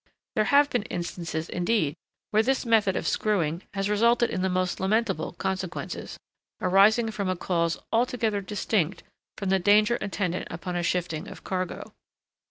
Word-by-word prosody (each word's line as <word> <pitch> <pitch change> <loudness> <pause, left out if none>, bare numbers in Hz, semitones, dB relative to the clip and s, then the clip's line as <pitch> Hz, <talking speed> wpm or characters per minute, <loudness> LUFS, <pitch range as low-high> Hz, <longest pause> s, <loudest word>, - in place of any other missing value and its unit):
There 215 - +2
have 285 +3 +5
been 245 - +1
instances, 170 -2 -4
indeed, 175 -4 0 0.4
where 215 - +4
this 265 +3 0
method 220 -5 +3
of - - -2
screwing 175 -6 0
has 195 0 0
resulted 235 +3 +3
in 185 - -2
the 190 - +1
most 185 0 -1
lamentable 190 -5 0
consequences, 190 -2 -4 0.4
arising 210 +5 +4
from 200 -3 -2
a 185 - +1
cause 170 -2 0 0.2
altogether 225 -3 +1
distinct 195 -2 -1 0.3
from 195 - -2
the 190 0 +3
danger 210 +5 +4
attendant 185 -3 -2
upon 175 +2 -5
a 175 - 0
shifting 170 -2 -1
of - - -10
cargo. 185 -2 -4
195 Hz, 155 wpm, -26 LUFS, 180-220 Hz, 0.4 s, have